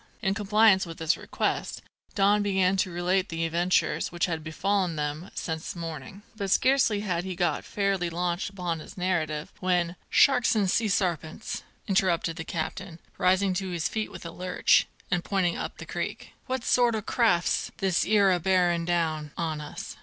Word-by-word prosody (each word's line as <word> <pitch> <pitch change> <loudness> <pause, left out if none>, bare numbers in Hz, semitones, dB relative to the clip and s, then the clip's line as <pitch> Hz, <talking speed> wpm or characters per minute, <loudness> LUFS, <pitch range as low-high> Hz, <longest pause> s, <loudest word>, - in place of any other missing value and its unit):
In 195 - +2
compliance 205 -2 +4
with 165 - -8
this 160 0 +1
request - - -3 0.3
Don 205 +1 +4
began 190 -2 +2
to 185 - +1
relate 180 +2 0
the 165 0 -2
adventures 170 +3 +1
which 175 -1 0
had 165 -3 -3
befallen 180 +2 0
them 150 +4 -3
since 160 +1 -4
morning; 165 +3 -7
but 200 -2 -3
scarcely 255 -2 +3
had 180 -4 -1
he 185 -1 -5
got 175 -3 0
fairly 195 -3 -1
launched 175 +2 -2
upon 180 -4 -3
his 190 +6 -11
narrative, 160 -4 -1
when: 180 -2 +1
"Sharks 250 -4 +4
an' 205 -3 +2
sea' 225 +4 +2
sarpents!" 180 -2 -2 0.3
interrupted 175 -4 +1
the 165 - -4
captain, 165 +2 -5 0.2
rising 185 +1 +3
to 190 +1 -2
his 170 -3 -1
feet 220 -1 -3
with - - -10
a 165 - -5
lurch, 180 +2 +2 0.2
and 175 -1 +1
pointing 185 -4 0
up - - -5
the - - -8
creek, - - -5
"what 260 -2 -2
sort 240 -2 +3
o' 215 - -3
craft's 210 -8 +1
this 190 -2 +1
'ere 200 -2 +4
a 180 - +2
bearin' 175 -1 +2
down 160 -3 0
on 160 -3 -2
us? 150 - -8
180 Hz, 175 wpm, -27 LUFS, 170-195 Hz, 0.3 s, compliance